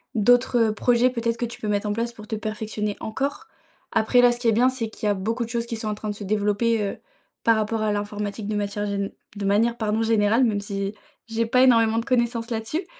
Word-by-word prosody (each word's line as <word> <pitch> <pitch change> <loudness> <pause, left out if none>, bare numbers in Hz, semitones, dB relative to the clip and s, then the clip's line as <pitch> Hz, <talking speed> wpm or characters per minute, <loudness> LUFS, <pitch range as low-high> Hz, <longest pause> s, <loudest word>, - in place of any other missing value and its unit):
d'autres, 245 +3 +4
heu, - - -1
projets 245 +3 +3
peut-être 235 -2 -1
que 240 - -1
tu 235 - -8
peux 215 - -4
mettre 205 0 0
en - - 0
place 235 +2 -2
pour 215 -2 -12
te 220 - -3
perfectionner 215 -1 -3
encore. 270 +6 -3 0.4
Après, 225 +2 +3
là, 245 0 +6
ce 240 - -4
qui 240 - -1
est - - +6
bien, 245 +4 +4
c'est 250 -4 -3
qu'il 215 - -4
y - - +3
a - - +3
beaucoup 225 +5 -2
de 230 - -7
choses 235 0 -2
qui 235 - -4
sont 220 -1 -5
en 210 - -2
train 215 0 -5
de - - -1
se 205 - -8
développer, 210 +3 +1
heu, 200 - -3 0.5
par 230 - +5
rapport 220 +1 -1
à 215 -1 +1
l'informatique 205 0 -4
de 210 - -2
matière 205 0 -2
gén 200 -1 -2 0.3
de 200 - -3
manière, 225 +4 +2
pardon 220 -1 0
générale, 225 +1 +3
même 215 -4 +2
si 200 0 -3 0.3
j'ai 230 0 -1
pas 250 +3 +3
énormément 230 -3 +4
de 230 - -4
connaissances 235 -2 0
là-dessus. 230 - -2
220 Hz, 250 wpm, -24 LUFS, 210-235 Hz, 0.5 s, là